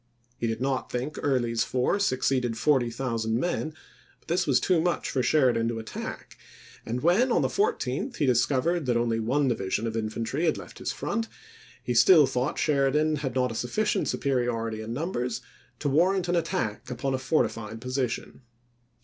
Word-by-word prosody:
He 120 - -2
did 115 0 -2
not 130 -1 -1
think 125 +5 -3
Early's 120 -5 +1
force 130 +11 +1
exceeded 125 -2 0
forty 130 -1 +2
thousand 115 -2 -1
men, 160 0 -1 0.5
but - - -20
this 180 +1 +1
was 130 -3 +4
too 175 +2 +2
much 175 +1 -1
for 130 - +1
Sheridan 125 -4 +3
to 115 -1 -2
attack; 110 -1 -7 0.5
and 120 +2 -2
when, 195 - +3
on - - +3
the - - +3
14th, 420 - -1
he 145 - 0
discovered 135 +5 +1
that 120 -1 +2
only 115 -1 0
one 135 +6 +1
division 105 -2 -1
of 115 -1 -3
infantry 115 +7 -2
had 160 - +2
left - - -10
his - - -2
front, 230 -1 -2 0.6
he 125 - -1
still 150 +6 +7
thought 130 +2 -1
Sheridan 150 +1 +2
had 135 -3 -4
not 125 -2 +1
a - - -4
sufficient 125 - 0
superiority 120 -4 -1
in 110 +1 -6
numbers 125 -3 -2 0.4
to - - -3
warrant 175 +6 +2
an 175 - +1
attack 165 - -2
upon 130 +2 -2
a 130 - -1
fortified 115 -6 -1
position. 130 0 -3
130 Hz, 175 wpm, -27 LUFS, 115-155 Hz, 0.6 s, still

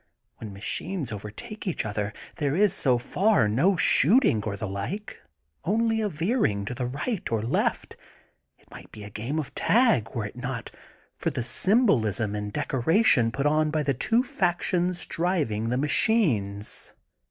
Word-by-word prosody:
When 110 -2 -8
machines 125 - -4
overtake 105 - -7
each 175 - -1
other 105 -1 -3 0.3
there 145 -1 0
is, 200 0 +3
so 130 -9 +2
far, 180 - +2
no 165 - +2
shooting 175 - +4
or 100 -2 -3
the 110 - -4
like, 110 - -5 0.4
only 225 +3 +1
a 210 - 0
veering 160 - 0
to 115 - -4
the 125 0 -3
right 150 - -3
or 110 -2 0
left. 115 - -1 0.6
It - - -29
might - - -12
be 105 - -10
a 105 - -9
game 115 +9 -4
of 155 -4 -4
tag, 220 - +3
were 115 -3 -2
it 105 - -8
not 125 -2 -5 0.5
for - - 0
the 120 - -3
symbolism 115 - +2
in 105 0 -4
decoration 130 - +2
put 140 +4 -3
on 155 +1 +2
by 155 0 0
the 140 -1 +1
two 230 - +1
factions 180 -4 -1
driv 170 - -1
ing 110 +2 -2
the 125 - 0
machines. 135 - +1
135 Hz, 165 wpm, -26 LUFS, -, 0.6 s, shooting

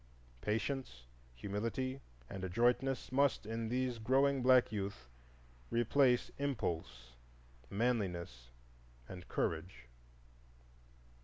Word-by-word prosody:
Patience, 110 - -2 0.3
humility, 115 - -3 0.3
and 95 +6 -7
adroitness 120 +8 +1
must, 140 -2 +2
in 115 +1 -3
these 125 -1 -1
growing 135 +4 +3
black 125 -2 +5
youth, 100 - -4 0.6
replace 125 +2 +3
impulse, 85 - -3 0.6
manliness, 90 - -1 0.6
and 90 -1 -9
courage. 80 -6 -2
115 Hz, 80 wpm, -36 LUFS, 90-130 Hz, 0.6 s, black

